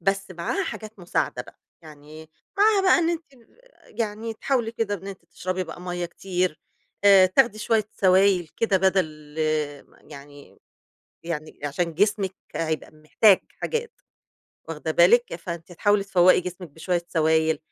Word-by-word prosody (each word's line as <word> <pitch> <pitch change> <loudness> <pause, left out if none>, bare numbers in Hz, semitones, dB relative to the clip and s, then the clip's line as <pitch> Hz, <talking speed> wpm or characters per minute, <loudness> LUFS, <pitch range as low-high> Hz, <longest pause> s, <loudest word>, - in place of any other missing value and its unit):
بس 195 +2 -1
معاها 185 - -2
حاجات 215 -1 -8
مساعدة 180 -1 -2
بقى، - - -18 0.2
يعني 155 +1 -13 0.3
معاها 415 -1 +4
بقى 375 - +5
إن 335 0 +1
أنتِ 335 -1 -3 0.8
يعني 220 +1 -3
تحاولي 240 -1 -1
كده 225 -3 -2
إن 195 0 -9
أنتِ 195 -3 -9
تشربي 185 +2 -4
بقى 165 +1 -10
مَيّة 175 -1 -4
كتير، 180 -2 -3 0.4
آآ، 195 -2 +8
تاخدي 215 +3 +2
شوية 215 -1 0
سوايل 185 -2 +3
كده 220 -4 +2
بدل 160 -6 -1 0.7
يعني 145 0 -13 0.6
يعني 160 -2 -6
عشان 165 +4 -2
جسمِك 200 +1 +1 0.2
هيبقى 160 -1 -3
محتاج 155 +6 +3 0.2
حاجات، 470 0 -4 0.7
واخدة 160 0 -4
بالِك، 180 +9 +4
فأنتِ 170 0 -7
هتحاولي 205 +3 +1
تفوّقي 185 -2 +4
جسمِك 180 0 -7
بشوية 170 +2 -3
سوايل، 160 -1 +2
185 Hz, 135 wpm, -24 LUFS, 165-210 Hz, 0.8 s, آآ